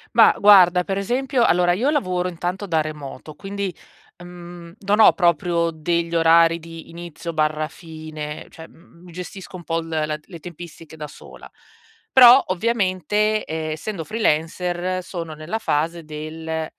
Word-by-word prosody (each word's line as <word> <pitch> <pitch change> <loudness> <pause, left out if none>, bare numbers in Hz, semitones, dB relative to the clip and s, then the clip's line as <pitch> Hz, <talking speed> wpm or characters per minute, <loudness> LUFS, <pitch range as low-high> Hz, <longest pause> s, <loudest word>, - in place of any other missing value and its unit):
Bah, - - +7
guarda, 180 -3 +6
per 195 - -2
esempio 250 +5 0
allora, 175 -2 +3
io 245 +10 0
lavoro 185 -10 0
intanto 180 +3 -4
da 160 -2 +1
remoto 150 -1 -6
quindi, 195 +1 -5 0.5
uhm, 175 -1 -11
non 205 +2 0
ho - - +8
proprio 170 -1 +1
degli 170 +1 -2
orari 165 0 +5
di 165 0 -11
inizio/fine, 155 -2 -5
cioè, 160 - -12
mhmm, 170 +1 -21
mi 180 - -13
gestisco 185 +2 -9
un 170 - -13
po' 165 +1 -1
l 165 - -10
la 155 -1 -2
le 165 +3 -13
tempistiche 165 -1 -11
da 150 -1 -7
sola, - - -14 0.6
però 255 +1 +9
ovviamente, 210 +1 0
ehm, 160 0 -4
essendo 165 +2 -5
freelancer 180 -2 -1
sono 170 -3 -6
nella 155 +9 -5
fase 165 -1 -1
del: 160 +1 -5
170 Hz, 145 wpm, -21 LUFS, 160-185 Hz, 0.6 s, però